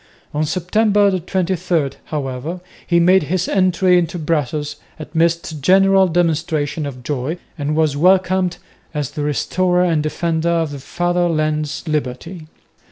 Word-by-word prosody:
On 150 Hz, +1 st, 0 dB
September 200 Hz, +2 st, +2 dB
23, 175 Hz, -4 st, -1 dB
however, 145 Hz, +3 st, -4 dB, 0.3 s
he 170 Hz, -1 st, +3 dB
made 185 Hz, +3 st, +5 dB
his 180 Hz, +4 st, -1 dB
entry 185 Hz, -1 st, +3 dB
into 170 Hz, 0 st, -2 dB
Brussels 150 Hz, -2 st, -2 dB, 0.2 s
amidst 160 Hz, 0 st, -1 dB
general 195 Hz, +3 st, +5 dB
demonstrations 160 Hz, -3 st, 0 dB
of 125 Hz, -3 st, -8 dB
joy 145 Hz, +4 st, -3 dB, 0.2 s
and 150 Hz, -2 st, -2 dB
was 155 Hz, -3 st, +2 dB
welcomed 185 Hz, +2 st, +2 dB, 0.4 s
as 145 Hz, -3 st, -2 dB
"the 150 Hz, -, -5 dB
Restorer 180 Hz, +6 st, +1 dB
and 165 Hz, -4 st, +1 dB
Defender 160 Hz, +2 st, -1 dB
of 165 Hz, -3 st, 0 dB
the 140 Hz, -, -6 dB
Father 175 Hz, +4 st, 0 dB
land's 155 Hz, 0 st, -1 dB
liberty." 155 Hz, +3 st, -4 dB
165 Hz, 130 wpm, -19 LUFS, 150-180 Hz, 0.4 s, made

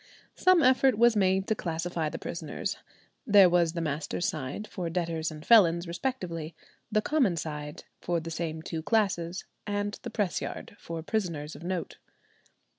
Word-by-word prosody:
Some 370 Hz, -3 st, +4 dB
effort 260 Hz, -2 st, +4 dB
was 235 Hz, 0 st, +5 dB
made 190 Hz, -1 st, +2 dB
to 220 Hz, -, +1 dB
classify 165 Hz, -3 st, -2 dB
the -, -, -5 dB
prisoners: -, -, -4 dB, 0.5 s
there 200 Hz, -3 st, +8 dB
was 170 Hz, -2 st, +3 dB
the 170 Hz, -, -2 dB
master's 155 Hz, +3 st, -2 dB
side, 145 Hz, +8 st, -4 dB
for 180 Hz, -5 st, -4 dB
debtors 165 Hz, -2 st, -1 dB
and 155 Hz, 0 st, -10 dB
felons 175 Hz, -6 st, +6 dB
respectively; 170 Hz, -, -4 dB, 0.4 s
the 215 Hz, 0 st, +2 dB
common 260 Hz, -, +2 dB
side, 150 Hz, -2 st, -5 dB, 0.2 s
for 175 Hz, -1 st, -1 dB
the 165 Hz, +1 st, -7 dB
same 160 Hz, -1 st, -4 dB
two 160 Hz, -1 st, -4 dB
classes; 185 Hz, -3 st, 0 dB, 0.2 s
and 205 Hz, 0 st, -2 dB
the 240 Hz, -, -5 dB
press 205 Hz, -5 st, -1 dB
yard, -, -, -6 dB
for 165 Hz, -1 st, -6 dB
prisoners 165 Hz, -7 st, -2 dB
of 145 Hz, -, -11 dB
note. 180 Hz, 0 st, -3 dB
175 Hz, 160 wpm, -29 LUFS, 160-205 Hz, 0.5 s, there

